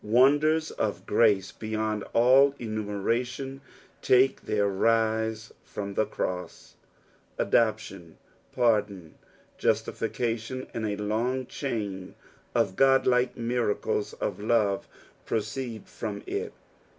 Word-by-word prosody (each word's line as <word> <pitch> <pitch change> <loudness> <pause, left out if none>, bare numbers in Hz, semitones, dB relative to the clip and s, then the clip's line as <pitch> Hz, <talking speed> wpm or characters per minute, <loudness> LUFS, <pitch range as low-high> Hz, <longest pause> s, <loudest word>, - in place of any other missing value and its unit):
Wonders 145 +8 +3
of 105 -2 -3
grace 100 -3 +3
beyond 110 -1 -3
all 135 +4 +5
enumeration 115 +5 -3 0.4
take 130 +1 +4
their 105 -1 +2
rise 110 +1 0
from 100 -1 -6
the 110 - +1
cross; 90 -1 -5 0.6
adoption, 100 -7 0 0.3
pardon, 105 -8 0 0.5
justification, 120 +2 -1
and 110 -2 -2
a 105 -1 -2
long 115 +5 -1
chain 105 -9 -4 0.4
of 95 - +1
godlike 130 -1 +3
niiracUs 115 -3 -1
of - - -2
love 105 -2 +1 0.4
pro - - +1
ceed 110 0 -5
from - - -6
it. - - -3
110 Hz, 100 wpm, -27 LUFS, 105-125 Hz, 0.6 s, all